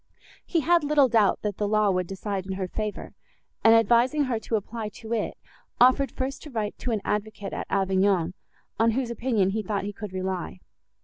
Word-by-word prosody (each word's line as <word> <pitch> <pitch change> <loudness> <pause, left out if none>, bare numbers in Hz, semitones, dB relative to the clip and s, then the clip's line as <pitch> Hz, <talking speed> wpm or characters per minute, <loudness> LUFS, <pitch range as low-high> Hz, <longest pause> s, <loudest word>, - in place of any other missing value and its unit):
He 335 - 0
had 340 +2 +3
little 290 -2 +4
doubt, 220 -4 +2
that 205 -2 -2
the 205 - 0
law 215 -1 +3
would 180 -1 -1
decide 195 0 -4
in 190 - -3
her 190 -1 -3
favour, 215 +2 -5 0.5
and, 225 0 +7
advising 240 +6 +4
her 250 -4 -1
to 225 - -2
apply 220 +1 -4
to 220 +2 -7
it, 220 -3 -2 0.4
offered 260 +2 +5
first 265 +1 -4
to 300 - -10
write 220 -5 -3
to - - -4
an 220 -3 0
advocate 210 -1 -3
at - - -4
Avignon, 190 -2 +2 0.5
on 225 +1 +4
whose 250 -3 -1
opinion 230 -5 +1
he 220 +2 -1
thought 200 -1 -2
he 205 +1 -4
could 210 -1 -7
rely. 185 - -4
215 Hz, 195 wpm, -26 LUFS, 195-235 Hz, 0.5 s, and